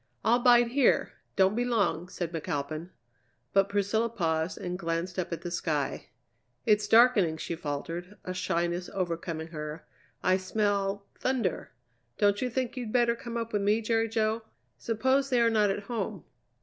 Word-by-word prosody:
"I'll 235 +2 +4
bide 240 -1 +6
here; 270 +2 +3 0.2
don't 190 0 +4
be 240 +3 0
long," 200 -8 0
said 175 -2 -4
McAlpin. 155 0 -3 0.6
But 195 0 +4
Priscilla 205 +3 +1
paused 165 -4 -1
and 180 0 -4
glanced 170 +1 -2
up 180 - -3
at 170 -1 -4
the 175 - -4
sky. 150 -5 -2 0.6
"It's 210 -1 +3
darkening," 225 -9 +5
she 170 - -4
faltered, 165 +5 -5
a 185 - -3
shyness 175 -1 -1
overcoming 170 -3 -3
her. 150 0 -6 0.4
"I 185 0 +4
smell 200 0 -1
thunder. 245 -9 -1 0.5
Don't 205 0 +3
you 255 - 0
think 255 +1 -2
you 250 -3 -4
better 235 +1 +2
come 235 0 -6
up 230 -1 -4
with 205 - +1
me 205 +2 +3
Jerry 225 0 +1
Jo? 220 0 0 0.3
Suppose 260 +5 +1
they 250 -2 +3
are 230 -1 +4
not 210 -2 +3
at 200 +1 -2
home?" 210 - -4
200 Hz, 160 wpm, -29 LUFS, 170-230 Hz, 0.6 s, bide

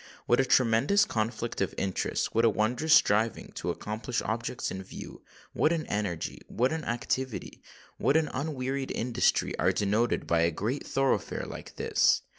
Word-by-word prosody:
What 120 - +3
a 135 - +4
tremendous 130 - +4
conflict 115 - -2
of 95 - -1
interests,—what 100 +4 0
a 115 - +6
wondrous 120 +9 0
striving 110 +2 +2
to - - -4
accomplish 110 +3 -3
objects 115 +3 -3
in 95 - -5
view,—what 95 - -4
an 165 -2 -1
energy—what 105 - -2
an 160 -1 -3
activity—what 130 +3 -2
an 160 -1 +2
unwearied 135 -1 -2
industry, 125 +1 +1
are - - +3
denoted 105 +4 +1
by 85 - +2
a 85 +1 +4
great 110 - -3
thoroughfare 135 0 0
like - - -9
this! - - +2
120 Hz, 140 wpm, -29 LUFS, 105-135 Hz, -, a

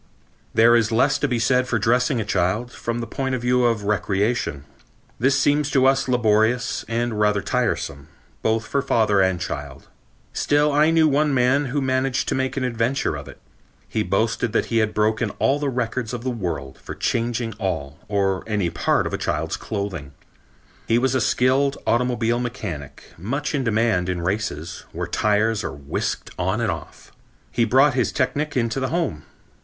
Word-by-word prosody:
There 115 +1 +5
is 115 -1 +2
less 130 +5 +3
to 145 - +1
be 125 -3 0
said 125 +2 +2
for 120 - +1
dressing 125 +4 +2
a 110 - -2
child, 105 +5 0
from 120 -1 -4
the - - -3
point 130 +3 -2
of 125 - -4
view 125 0 +3
of 115 -3 +1
recreation. 100 - 0 0.6
This 135 +3 +3
seems 145 +1 +2
to 135 -2 +3
us 135 0 +3
laborious 115 -1 +2
and 115 -1 -1
rather 105 -2 +2
tiresome, 70 0 -2 0.3
both 110 0 0
for 140 - 0
father 105 -6 +2
and 95 -2 +2
child. 70 -4 -6 0.4
Still 145 +1 +2
I 150 +2 +4
knew 165 -1 +4
one 145 0 +2
man 130 +3 +3
who 140 +2 -1
managed 130 0 0
to - - 0
make 130 +1 -1
an 135 - 0
adventure 120 - 0
of 70 0 -8
it. 70 - -12 0.5
He - - -1
boasted - - 0
that - - +2
he 115 - +4
had 110 -1 0
broken 110 +1 +1
all 140 +2 +2
the 145 -1 -1
records 125 -1 -2
of 120 - -7
the 130 - -1
world 85 - -4
for - - -8
changing 115 0 -1
all 80 -7 -3
or 100 -2 0
any 105 -6 0
part - - +1
of - - -4
a - - -2
child's - - -1
clothing. 95 -10 -5 0.7
He 115 - +3
was 130 +1 +1
a 130 - +1
skilled 130 +5 +2
automobile 120 0 +1
mechanic, 95 - -6
much 135 - -3
in 140 -3 0
demand 110 -6 +1
in 90 -2 -2
races, 90 -4 -3
where - - -3
tires 105 0 +1
are - - -3
whisked 70 0 -4
on - - 0
and - - +1
off. - - -9 0.4
He 115 - +2
brought 135 +4 +4
his 125 -2 +1
technic 145 -1 -1
into 115 +2 0
the 130 -1 -1
home. 120 - -2
115 Hz, 180 wpm, -22 LUFS, 105-130 Hz, 0.7 s, There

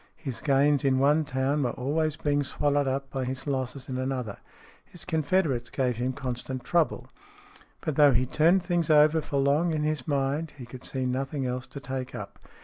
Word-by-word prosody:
His 130 -5 -6
gains 145 0 +3
in 135 -1 +3
one 145 +3 +3
town 135 +2 0
were 125 -3 0
always 150 +4 -1
being 145 -1 0
swallowed 145 +1 0
up 135 +1 -2
by 135 -1 -2
his 130 +1 -4
losses 130 -2 -3
in 130 -2 -3
another. 130 -5 -3 0.4
His 175 - -9
confederates 155 -6 0
gave 125 -4 -1
him 125 +2 -1
constant 130 -1 -4
trouble. 170 -3 +1 0.7
But 155 - -3
though 145 -2 +7
he 125 +2 +2
turned 170 +7 +3
things 175 -3 0
over 155 +1 +5
for 145 - -3
long 145 +5 +2
in 150 - -1
his 150 -4 -2
mind, 145 +2 -1
he 125 - -8
could 125 +1 -11
see 130 -1 -3
nothing 135 +2 -2
else 125 0 -3
to 140 - -8
take 130 -1 -5
up. - - -8
140 Hz, 190 wpm, -27 LUFS, 130-150 Hz, 0.7 s, though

